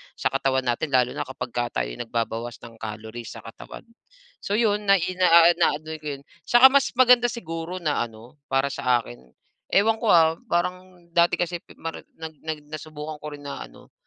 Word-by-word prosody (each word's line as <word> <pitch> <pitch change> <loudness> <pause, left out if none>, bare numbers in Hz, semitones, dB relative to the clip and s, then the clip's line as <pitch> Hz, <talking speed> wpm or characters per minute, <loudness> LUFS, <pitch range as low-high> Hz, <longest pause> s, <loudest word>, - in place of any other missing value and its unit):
sa - - -1
katawan 130 -1 +1
natin 120 +6 0
lalo 125 -1 +3
na - - -4
kapagka 120 -2 -3
tayo'y - - -7
nagbabawas 115 0 -3
ng 115 -1 -11
calories 110 +2 -7
sa - - -10
katawan. - - -11 0.6
So, 200 - -1
'yon 210 -2 +1
nai 195 -3 +5 0.2
ah, 170 -1 +7
na 170 - +3
ano 155 +1 -10
'ko 150 - -9
'yon 140 - -19 0.2
Saka 240 +2 +8
mas 280 0 +4
maganda 250 -1 +6
siguro 165 -4 -5
na 150 -2 0
ano, 120 +5 -12
para 135 +1 +1
sa 125 -2 +2
akin, 120 - -11 0.5
ewan 220 +3 +3
ko, 230 - -2
ah 165 -1 +5
parang 180 +1 -2
dati 170 0 +4
kasi 175 0 -1 0.2
mari 165 0 -5 0.2
nag 160 -1 -8
nag 155 -1 -4
nasubukan 155 0 -7
ko 150 -1 -7
rin 145 - -14
na 140 - -6
ano - - -19
155 Hz, 185 wpm, -24 LUFS, 125-180 Hz, 0.6 s, Saka